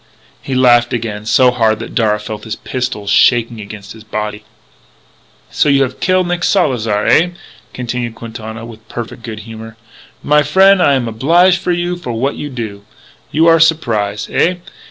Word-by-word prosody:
He 135 - -4
laughed 120 -2 +4
again 110 -3 -4
so 125 +2 +4
hard 110 -3 +1
that 115 - -8
Darragh 105 -3 +1
felt 105 0 -7
his 110 -1 -4
pistols 115 -6 -4
shaking 115 0 +3
against 105 0 -10
his 110 -1 -14
body. 105 0 -5 1.1
"So - - +2
you 140 -1 +4
have 130 -1 -5
kill 185 0 +2
Nick 175 0 -2
Salzar, 115 - +1
eh?" 175 +2 +4 0.4
continued 120 -2 -4
Quintana 110 -1 -8
with 115 -1 -13
perfect 120 0 -7
good 110 -2 -7
humour. 110 0 -10 0.5
"My 150 0 +4
frien', 190 +6 +4
I 145 - +4
am 125 -3 -1
oblige 170 - +3
to - - -3
you 175 0 -1
for 125 -9 -6
what 130 +5 -1
you 145 - -6
do. 110 -6 -6 0.5
You 160 +2 +2
are 165 0 +5
surprise? 110 -11 +1
Eh? 180 +2 +2
120 Hz, 170 wpm, -15 LUFS, 110-145 Hz, 1.1 s, are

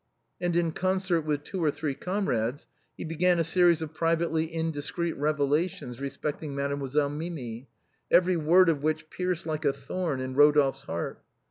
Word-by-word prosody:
And 175 -1 0
in 170 -1 +2
concert 185 0 +1
with 145 -1 -1
two 185 +1 -4
or 155 - +4
three 145 0 -2
comrades 140 - -2 0.3
he - - -5
began 170 +2 +2
a 165 - +2
series 170 0 +4
of 160 0 -7
privately 165 0 +1
indiscreet 165 +2 -2
revelations 145 -2 -1
respecting 145 +1 -4
Made 140 0 -1
moiselle 140 +1 0
Minii, 145 -6 -6 0.4
every 180 +1 +4
word 170 +3 +5
of 155 -4 +2
which 155 +1 -2
pierced 180 -2 -2
like 155 -1 -3
a 145 - +3
thorn 140 +3 -3
to 130 0 -3
Rodolphe's 145 0 +4
heart. 85 +1 -4
155 Hz, 160 wpm, -28 LUFS, 140-170 Hz, 0.4 s, word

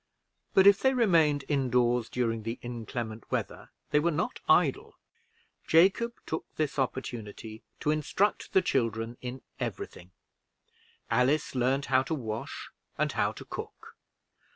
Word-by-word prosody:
But 190 - +7
if 200 -1 +8
they 265 0 +3
remained 165 - +3
in 135 -2 0
doors 120 -1 +2
during 115 -2 -1
the 115 +2 -4
inclement 115 -2 -5
weather, - - -3 0.2
they 150 - +4
were 165 +3 +2
not 155 - -2
idle. - - +3 0.7
Jacob 195 +8 +4
took 160 - -3
this 150 -2 -1
opportunity 115 -4 -4 0.2
to 150 - +2
instruct 155 +7 0
the 190 - +5
children 115 - -1
in 125 +1 -6 0.2
every - - -3
thing. 90 - -15 1.0
Alice 125 +6 +2
learned 130 +2 +1
how 130 - +6
to 145 +5 -2
wash 110 -6 -5 0.3
and - - +1
how - - +1
to - - -10
cook. - - -8
130 Hz, 140 wpm, -29 LUFS, 115-155 Hz, 1.0 s, if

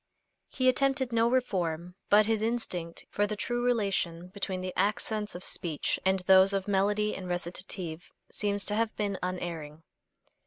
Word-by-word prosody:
He 255 - 0
attempted 265 0 +2
no 230 0 +4
reform, 180 -9 -1 0.2
but 210 +1 +6
his 220 0 +1
instinct 200 -8 -2
for 205 0 +1
the 210 - -3
true 240 +3 -2
relation 195 -7 0
between 190 -1 -3
the 185 0 -4
accents 210 +1 0
of 180 - -7
speech 165 -5 -1
and 190 0 +2
those 190 +1 +6
of 195 0 -1
melody 205 +2 +1
and 185 -1 -6
recitative 175 -1 -4 0.2
seems 205 -1 -1
to 210 - -1
have 225 0 0
been 200 -3 -2
unerring. 165 -4 -4
195 Hz, 155 wpm, -29 LUFS, 180-215 Hz, 0.2 s, but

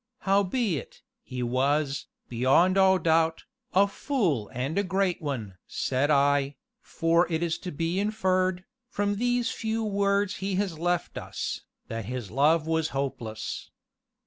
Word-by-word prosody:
"Howbeit, 195 - 0 0.2
he 125 -1 -5
was, 135 +3 0 0.2
beyond 130 +10 +3
all 190 -1 +5
doubt, 160 -1 +2 0.3
a 195 +3 +5
fool 195 - -1
and 130 +6 -3
a - - +2
great 190 -1 0
one!" 115 - -4
said 135 +3 0
I, 140 -1 +3 0.3
"for 165 +1 +1
it 160 +1 0
is 165 -2 -1
to 180 - -6
be 165 +5 -1
inferred, 185 -3 +1 0.2
from 205 -2 -1
these 245 +1 +1
few 225 0 -2
words 200 -1 +1
he 195 0 -2
has 185 -5 -1
left 175 0 -1
us, - - -4 0.3
that 115 -2 -4
his 120 -2 -5
love 150 +5 +3
was 160 0 0
hopeless. 120 -5 -4
165 Hz, 140 wpm, -27 LUFS, 140-195 Hz, 0.3 s, all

